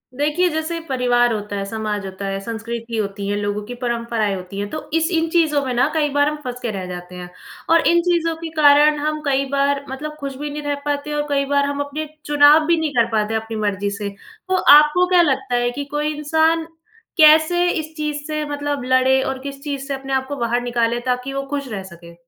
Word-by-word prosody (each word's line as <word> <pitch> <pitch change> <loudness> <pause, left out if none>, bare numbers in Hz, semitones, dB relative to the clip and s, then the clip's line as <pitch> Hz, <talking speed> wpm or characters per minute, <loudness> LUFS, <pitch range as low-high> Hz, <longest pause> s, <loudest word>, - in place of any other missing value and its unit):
देखिए, 300 +6 +1
जैसे 315 +1 -3
परिवार 245 -2 +2
होता 210 -1 -4
है, 200 - -2
समाज 210 -1 -3
होता 190 +1 -6
है, 195 0 -2
संस्कृति 230 +1 -5
होती 200 -1 -3
है, 205 - -1
लोगों 205 0 -2
की 245 - -7
परंपराएँ 235 -4 -1
होती 185 +1 -7
हैं, 205 0 -3
तो 310 - -7
इस 325 +1 +2
इन 330 -1 +1
चीज़ों 315 -4 +2
में 255 - -2
ना 245 +2 +3
कई 305 -2 +1
बार 285 +1 +2
हम 300 - -4
फँस 250 -1 -5
के 235 - -2
रह 190 -3 -5
जाते 180 0 -8
हैं। 180 -1 -8 0.4
और 330 0 +4
इन 340 0 +4
चीज़ों 335 -2 0
के 325 0 -7
कारण 295 +1 +6
हम 305 +1 -2
कई 275 -1 +1
बार 280 0 +1
मतलब 300 +3 -6
खुश 275 -2 -5
भी 295 +2 -4
नहीं 295 +1 -5
रह 290 0 -1
पाते 290 0 -2
और 295 0 -1
कई 280 -1 +1
बार 280 0 +1
हम 285 0 -3
अपने 300 +2 -5 0.2
चुनाव 295 +1 +6
भी 340 0 +3
नहीं 315 -2 -1
कर 235 -2 +3
पाते 215 0 0
अपनी 220 0 -3
मर्ज़ी 205 -1 -1
से, 200 0 -4 0.4
तो 375 - +2
आपको 300 +2 +6
क्या 360 -1 +5
लगता 270 -5 0
है 240 0 +1
कि 285 +3 -5
कोई 300 +1 0
इंसान 320 +2 +1 0.5
कैसे 315 +2 +6
इस 315 -2 -3
चीज़ 300 -1 -3
से 305 -1 -2
मतलब 290 -2 -3
लड़े 260 +1 +3
और 265 0 -3
किस 275 0 -7
चीज़ 280 -2 -4
से 280 - -2
अपने 270 0 -5
आप 265 0 0
को 285 - -4
बाहर 240 -1 -1
निकाले 240 -1 0
ताकि 250 +1 -2
वो 275 0 -2
खुश 280 -1 -3
रह 195 -3 -4
सके? 170 -2 -13
275 Hz, 230 wpm, -20 LUFS, 230-300 Hz, 0.5 s, कारण